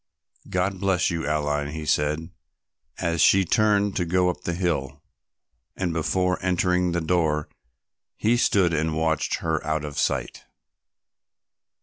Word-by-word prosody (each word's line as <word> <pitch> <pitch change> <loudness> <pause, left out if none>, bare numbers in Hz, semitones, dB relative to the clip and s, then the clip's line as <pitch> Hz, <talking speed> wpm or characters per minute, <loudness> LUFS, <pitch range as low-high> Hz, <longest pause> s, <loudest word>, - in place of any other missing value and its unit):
"God 90 +1 -1
bless 95 -4 +1
you, 80 -3 -3
Aline," 75 -1 -1
he 80 -1 -5
said, 75 +2 0 0.7
as 85 -1 -1
she 95 -1 +5
turned 105 +1 +2
to 90 - +1
go 90 +1 +2
up - - -12
the 85 - -1
hill, 75 -6 -2 0.7
and 90 -3 -2
before 90 +3 0
entering 90 -1 +1
the 85 0 -1
door 80 -3 0 0.7
he 115 +3 +2
stood 95 -7 +2
and 80 0 0
watched 80 -1 0
her 80 -2 0
out 80 -1 -2
of 75 -1 -5
sight. - - -2
85 Hz, 135 wpm, -24 LUFS, 75-90 Hz, 0.7 s, she